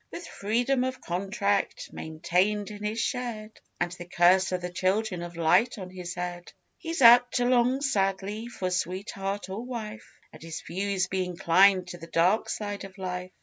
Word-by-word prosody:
With 345 - -8
Freedom 245 +5 0
of 260 0 -3
Contract 195 +2 -1
maintained 180 +6 -1
in 210 0 -9
his 215 +2 -2
shed, 230 -3 -3 0.3
And 175 0 0
the 175 -1 -8
curse 180 +2 +4
of 185 - 0
the 180 0 -5
Children 185 +1 0
of 175 0 -7
Light 170 +9 +3
on 185 -2 -7
his 180 -1 -6
head, 175 0 -5 0.3
He's 330 -5 -2
apt 245 +1 +8
to 245 - +2
long 250 +2 +3
sadly 200 -3 -1
for 185 -6 -4
sweetheart 195 +2 -3
or 195 +5 -5
wife, 225 -3 -7 0.2
And - - -13
his 165 0 -6
views 195 +1 -1
be 190 0 -1
inclined 185 +1 +3
to 175 - -8
the 165 - -10
dark 180 +6 +2
side 205 -1 -4
of 195 0 -10
life. 180 -1 -4
195 Hz, 175 wpm, -27 LUFS, 180-220 Hz, 0.3 s, apt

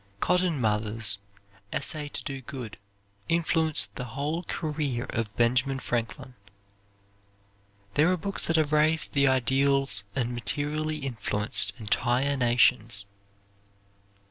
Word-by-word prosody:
Cotton 180 - +1
Mather's 105 -2 +1 0.5
"Essay 150 -2 -1
to - - -6
Do 135 -2 -5
Good" 125 -4 -8 0.5
influenced 165 -2 +2
the 125 - -5
whole 150 +4 -1
career 150 -7 -3
of 115 -3 -2
Benjamin 125 +3 +2
Franklin. 125 +2 -4 1.6
There 160 +5 +4
are 185 - +1
books 195 +4 -3
that 165 - +1
have 155 -2 +2
raised 155 +1 +2
the 140 -1 +4
ideals 130 -3 +3
and 125 -2 -1
materially 150 +5 0
influenced 105 -4 -1
entire 120 +5 +1
nations. 120 -4 +2
135 Hz, 110 wpm, -27 LUFS, 115-155 Hz, 1.6 s, There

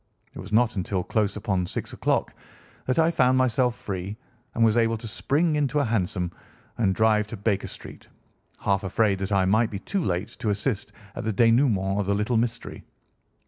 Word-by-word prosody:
It - - -10
was 95 +2 -9
not 120 +2 +3
until 95 0 -1
close 105 0 0
upon 95 -4 -1
six - - -5
o'clock - - 0 0.5
that 130 - +1
I 165 0 +4
found 130 -5 +3
myself 125 -1 +2
free 95 0 -5 0.4
and 115 - +4
was 110 -1 +3
able 115 -1 +2
to 115 +1 -8
spring 150 +8 0
into 150 -1 0
a 145 - +2
hansom 90 -5 -1 0.5
and 95 -5 +2
drive 110 0 +3
to 115 - -7
Baker 100 0 -1
Street, - - -10 0.5
half 100 0 +1
afraid 100 0 +1
that 95 +1 -3
I 95 -2 +3
might 110 +4 +3
be 100 - -5
too 185 - -2
late 90 - -1
to 115 -3 -1
assist 105 +1 -2 0.2
at - - -5
the 110 - 0
dénouement 110 -4 +3
of 100 - -1
the 100 - +2
little 105 +4 0
mystery. 115 0 -3
110 Hz, 190 wpm, -25 LUFS, 100-120 Hz, 0.5 s, I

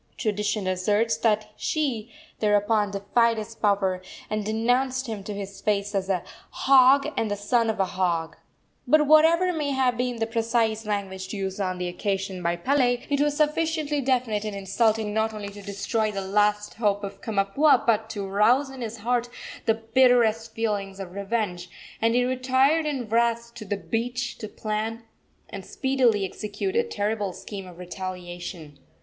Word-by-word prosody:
Tradition 210 -1 -1
asserts 205 +5 +1
that 215 -1 +1
she 255 -8 -2 0.3
thereupon 210 0 +2
defied 225 +4 +1
his 215 +1 -5
power, 195 -4 +1 0.3
and 215 0 -1
denounced 245 +5 +1
him 220 -5 -5
to 210 - -5
his 200 -1 -7
face 205 -1 0
as 195 -1 -1
"a 185 -3 0 0.3
hog 270 +1 +5
and 225 - 0
the 205 - -1
son 225 +3 +1
of 220 - -2
a 195 - +3
hog." 170 -3 -1 0.5
But, 305 0 +5
whatever 330 +4 +5
may 300 -3 -1
have 260 -3 +1
been 250 0 -1
the 225 -1 -1
precise 225 -1 0
language 195 -1 -3
used 195 0 -3
on 185 -1 -1
the 180 0 -3
occasion 190 +1 -3
by 170 0 0
Pele, 245 +5 +1
it 285 0 +2
was 295 0 +1
sufficiently 305 -1 +1
definite 245 -5 0
and 210 -2 -4
insulting 210 +2 +1
not 220 0 0
only 205 -1 -5
to 205 0 -11
destroy 200 +2 -1
the 200 - -4
last 210 +1 +1
hope 205 -2 0
of 195 0 -7
Kamapuaa, 225 +6 +2
but 220 -1 +2
to 205 -3 -4
arouse 235 +8 +3
in 265 -1 -9
his 230 0 -5
heart 245 0 +1 0.4
the 225 - +4
bitterest 225 -1 +3
feelings 205 -3 -2
of 190 -2 -6
revenge, 200 -2 -2 0.3
and 230 +1 +3
he 245 0 +3
retired 260 +5 +2
in 265 -6 -2
wrath 235 +1 +1
to 215 - -9
the 205 +1 -2
beach 240 +4 -3
to 215 - -5
plan 220 +2 -3 0.5
and - - -6
speedily 255 -7 +1
execute 210 - -4
a 470 - +5
terrible 210 - -2
scheme 195 -1 -8
of 175 -2 -12
retaliation. 175 -4 -7
220 Hz, 165 wpm, -25 LUFS, 200-245 Hz, 0.5 s, hog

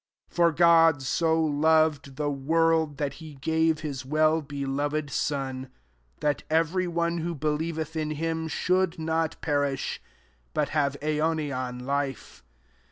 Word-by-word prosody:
'' - - -67
16 - - -25
For 170 -1 +4
God 165 -3 +5
so 160 +4 +1
loved 155 -2 +2
the 145 +1 -1
world, 160 +1 +1
that 140 -1 -2
he 155 -2 -10
gave 160 +2 +1
his 140 -5 -4
well 155 +3 +2
beioved 145 +1 -3
Sod, 135 -2 -2 0.2
% - - -39
that 145 -1 0
every, 165 +3 +1
one 170 0 -1
who 170 +1 -3
believeth 155 +2 -2
in 155 -1 -1
him 160 +1 -2
shouldnot 165 -2 0
perish, 145 -3 -1 0.5
but - - +1
have 145 -2 0
aionian 150 -5 -1
life. 140 - -3
155 Hz, 135 wpm, -27 LUFS, 140-160 Hz, 0.5 s, God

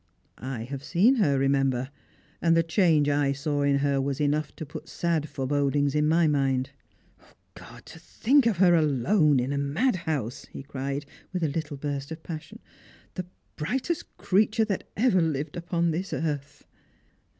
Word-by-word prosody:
I 130 -2 -5
have 135 +3 -6
seen 210 - +3
her, 145 - +3
remember, 135 -1 +1 0.5
and 165 -1 +4
the 165 - +4
change 165 -3 +3
I 145 -1 +2
saw 145 +1 -2
in 140 -1 +3
her 140 -1 +1
was 140 +1 -2
enough 150 0 0
to 160 - -6
put 150 - -9
sad 165 -3 -1
forebodings 140 0 0
into 150 0 +2
my 165 +1 +4
mind. 135 -3 +1 0.8
God, - - -13
to 165 - -12
think 245 - +2
of 215 -6 +1
her 180 -1 +5
alone 150 - +3
in 130 +3 -1
a 140 - -1
madhouse," 155 - -1
he - - -9
cried, 140 +1 -4 0.3
with 180 -2 -2
a 155 - +2
httle 150 -1 -4
burst 140 -1 -4
of 160 0 -7
passion, 160 -3 -7 0.3
" - - -27
the 180 -1 -5 0.3
brightest 265 - -3
creature 215 +3 +2
that 205 -3 -4
ever 210 -5 +3
Lived 150 -1 -2
upon 170 -1 0
this 180 +5 -3
earth!" 145 -2 -4
150 Hz, 165 wpm, -26 LUFS, 140-170 Hz, 0.8 s, her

